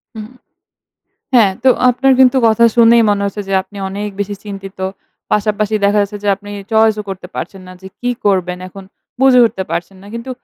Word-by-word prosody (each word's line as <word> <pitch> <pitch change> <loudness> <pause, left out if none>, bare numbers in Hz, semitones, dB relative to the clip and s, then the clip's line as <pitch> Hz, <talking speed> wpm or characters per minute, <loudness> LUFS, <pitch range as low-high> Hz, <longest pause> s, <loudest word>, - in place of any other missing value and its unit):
হুম। 215 -1 -7 1.1
হ্যাঁ, 215 -6 +5
তো - - +6 0.2
আপনার 265 +2 +2
কিন্তু 260 0 +5
কথা 225 +1 +3
শুনেই 235 0 +6
মনে 200 -1 0
হচ্ছে 205 +1 -4
যে - - -3
আপনি 205 - -17
অনেক 205 +2 -4
বেশি 205 0 -3
চিন্তিত। 195 -2 -9 0.5
পাশাপাশি 210 0 0
দেখা 205 +1 +3
যাচ্ছে 205 +1 -5
যে - - 0
আপনি 205 +1 -12 0.2
choice 220 -1 +4
ও - - -5
করতে 190 -1 -7
পারছেন 195 - -6
না - - -10
যে 190 - -9
কি 245 - -1 0.2
করবেন? 180 -2 0
এখন 195 +1 -12 0.4
বুঝে 265 -2 +6
উঠতে 190 -4 -4
পারছেন 175 +3 -4
না। - - -14
কিন্তু 235 +3 -6
205 Hz, 190 wpm, -15 LUFS, 195-225 Hz, 1.1 s, তো